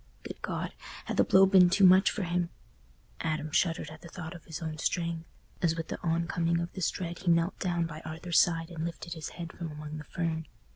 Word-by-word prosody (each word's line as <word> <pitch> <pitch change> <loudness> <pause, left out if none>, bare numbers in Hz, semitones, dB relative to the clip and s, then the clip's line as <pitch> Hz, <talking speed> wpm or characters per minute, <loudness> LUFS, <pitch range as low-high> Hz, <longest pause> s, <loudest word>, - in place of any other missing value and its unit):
Good - - -8
God! - - -3 0.3
had - - -3
the - - +6
blow 190 +1 +6
been 190 -2 +7
too 195 +2 +5
much 185 +2 +7
for 210 - -2
him? 175 0 0 0.7
Adam 155 -1 -2
shuddered 165 -1 +1
at 155 - -11
the - - -10
thought 165 -1 -7
of 170 - -12
his 160 - -6
own 155 -2 -5
strength, 170 -1 -1 0.3
as 165 -3 +2
with 165 -1 -5
the - - -5
oncoming 170 0 +1
of 170 0 -4
this 185 -3 0
dread 175 -1 -5
he 190 - -11
knelt 170 +2 +2
down 175 -2 0
by 155 -1 -6
Arthur's 165 +1 +1
side 165 0 +2
and 165 -2 -4
lifted 170 0 -5
his 160 -3 -6
head 170 -1 -6
from 165 -3 -6
among 150 0 -7
the - - -7
fern. 160 0 -3
170 Hz, 225 wpm, -30 LUFS, 160-175 Hz, 0.7 s, been